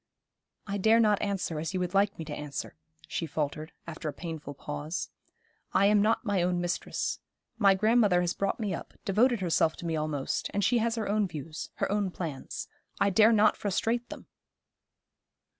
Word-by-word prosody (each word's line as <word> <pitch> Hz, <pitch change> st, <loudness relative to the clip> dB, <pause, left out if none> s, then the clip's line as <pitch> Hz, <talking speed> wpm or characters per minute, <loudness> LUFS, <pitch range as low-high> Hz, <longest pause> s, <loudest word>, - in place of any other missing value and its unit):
'I 200 Hz, -1 st, -2 dB
dare 220 Hz, +4 st, +5 dB
not 210 Hz, -3 st, +3 dB
answer 195 Hz, -6 st, -1 dB
as 165 Hz, +4 st, -3 dB
you -, -, +1 dB
would 180 Hz, 0 st, -2 dB
like 200 Hz, +1 st, +2 dB
me 160 Hz, -, -5 dB
to 150 Hz, -, -6 dB
answer,' 145 Hz, -2 st, -5 dB, 0.3 s
she 165 Hz, -, -3 dB
faltered, 155 Hz, +1 st, -3 dB
after 160 Hz, -1 st, -5 dB
a -, -, -3 dB
painful 160 Hz, -4 st, -6 dB
pause. 150 Hz, +4 st, -4 dB, 0.6 s
'I 195 Hz, -, +4 dB
am 205 Hz, 0 st, +5 dB
not 220 Hz, +3 st, +2 dB
my 200 Hz, -4 st, +1 dB
own 175 Hz, 0 st, +1 dB
mistress. 175 Hz, -1 st, -2 dB, 0.4 s
My 195 Hz, -3 st, +6 dB
grandmother 210 Hz, -3 st, +4 dB
has 175 Hz, -1 st, 0 dB
brought 200 Hz, -, -1 dB
me 210 Hz, -4 st, -1 dB
up, -, -, -7 dB
devoted 225 Hz, +3 st, +3 dB
herself 165 Hz, -2 st, +2 dB
to -, -, -8 dB
me 165 Hz, -1 st, -1 dB
almost, 150 Hz, -3 st, -2 dB
and 200 Hz, -, +1 dB
she 245 Hz, +3 st, +3 dB
has 230 Hz, +1 st, +1 dB
her 225 Hz, -2 st, -2 dB
own 210 Hz, 0 st, +2 dB
views, 155 Hz, -1 st, -6 dB
her -, -, -1 dB
own 205 Hz, -2 st, +1 dB
plans. 160 Hz, -7 st, -5 dB, 0.3 s
I 200 Hz, -, +3 dB
dare 220 Hz, +4 st, +6 dB
not 215 Hz, -1 st, +5 dB
frustrate 225 Hz, +4 st, -1 dB
them!' -, -, -9 dB
190 Hz, 185 wpm, -29 LUFS, 160-210 Hz, 0.6 s, My